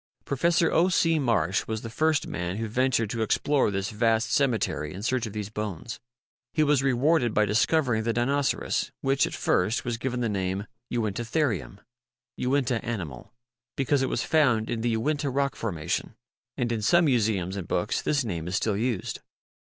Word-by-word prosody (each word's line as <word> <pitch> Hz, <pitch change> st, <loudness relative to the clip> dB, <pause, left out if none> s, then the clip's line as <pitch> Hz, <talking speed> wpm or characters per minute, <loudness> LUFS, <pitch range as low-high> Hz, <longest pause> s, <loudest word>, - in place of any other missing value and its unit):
Professor 165 Hz, +4 st, +2 dB
0. 175 Hz, +3 st, +4 dB
C. 165 Hz, -3 st, +3 dB
Marsh 105 Hz, -, +1 dB
was 110 Hz, -1 st, -3 dB
the -, -, -4 dB
first 155 Hz, +4 st, +1 dB
man 90 Hz, +2 st, -3 dB
who 115 Hz, 0 st, -2 dB
ventured 120 Hz, -1 st, +1 dB
to 115 Hz, -, -2 dB
explore 135 Hz, +4 st, +2 dB
this 95 Hz, -1 st, -2 dB
vast 115 Hz, +1 st, +1 dB
cemetery 110 Hz, -, 0 dB
in 100 Hz, -, -7 dB
search 125 Hz, 0 st, 0 dB
of 105 Hz, -, -8 dB
these 105 Hz, -1 st, -5 dB
bones. 105 Hz, +2 st, -5 dB, 0.6 s
He 155 Hz, -, +4 dB
was 145 Hz, -2 st, +3 dB
rewarded 135 Hz, -1 st, +2 dB
by 105 Hz, -, +4 dB
discovering 115 Hz, +3 st, +2 dB
the 115 Hz, +1 st, 0 dB
Dinoceras 135 Hz, +4 st, 0 dB
which, 135 Hz, 0 st, +2 dB
at -, -, -6 dB
first, 105 Hz, +9 st, +1 dB
was 120 Hz, -1 st, -2 dB
given 125 Hz, -1 st, -2 dB
the 120 Hz, -, +1 dB
name 95 Hz, -1 st, -2 dB, 0.3 s
Uintatherium 115 Hz, -, -1 dB, 0.6 s
Uinta 125 Hz, -2 st, 0 dB
Animal 85 Hz, -, -5 dB, 0.4 s
because 135 Hz, 0 st, +1 dB
it 130 Hz, -, 0 dB
was -, -, -1 dB
found 125 Hz, -9 st, +2 dB
in 115 Hz, -, -2 dB
the 120 Hz, -, +1 dB
Uinta 145 Hz, +5 st, 0 dB
rock 140 Hz, +1 st, 0 dB
formation, 85 Hz, -9 st, -3 dB, 0.4 s
and 120 Hz, -1 st, -1 dB
in 115 Hz, -2 st, -1 dB
some 170 Hz, +11 st, +4 dB
museums 105 Hz, -, +1 dB
and 95 Hz, -4 st, -5 dB
books 95 Hz, +6 st, 0 dB
this 145 Hz, -4 st, 0 dB
name 85 Hz, -6 st, -4 dB
is 90 Hz, -, -2 dB
still 105 Hz, +1 st, +1 dB
used. 115 Hz, -1 st, -2 dB
115 Hz, 175 wpm, -27 LUFS, 105-135 Hz, 0.6 s, 0